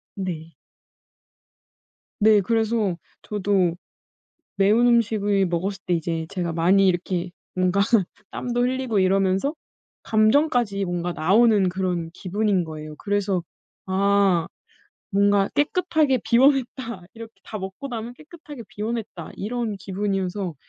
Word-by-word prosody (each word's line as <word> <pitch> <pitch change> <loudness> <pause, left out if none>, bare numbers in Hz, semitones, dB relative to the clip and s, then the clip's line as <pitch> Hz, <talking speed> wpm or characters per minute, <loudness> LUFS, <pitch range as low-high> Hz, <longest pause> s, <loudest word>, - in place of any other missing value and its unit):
네. 170 -4 -5 1.7
네. 215 -1 +6
그래서 220 -3 0 0.2
저도 195 -4 0 0.8
매운 205 +5 +4
음식을 205 -4 +2
먹었을 190 +4 -2
때 180 - +2
이제 165 -1 -3
제가 175 -4 -3
많이 185 +4 +4
이렇게 180 0 -1 0.2
뭔가 185 +1 +2 0.5
땀도 245 -1 -2
흘리고 250 -3 0
이러면서 195 - +1 0.5
감정까지 220 -2 +2
뭔가 175 0 -2
나오는 200 +3 +4
그런 180 -3 -2
기분인 195 +1 0
거예요. 155 -1 -8
그래서 200 -2 -1 0.5
'아 195 -2 +2 0.6
뭔가 200 0 +3
깨끗하게 305 -3 +1
비워냈다.' 250 -4 +2
이렇게 230 0 -10
다 215 - -6
먹고 190 +9 -7
나면 235 0 -5
'깨끗하게 300 -2 -12
비워냈다.' 215 -5 -5
이런 225 0 -3
기분이어서 195 -2 -3
200 Hz, 260 characters per minute, -23 LUFS, 185-230 Hz, 1.7 s, 네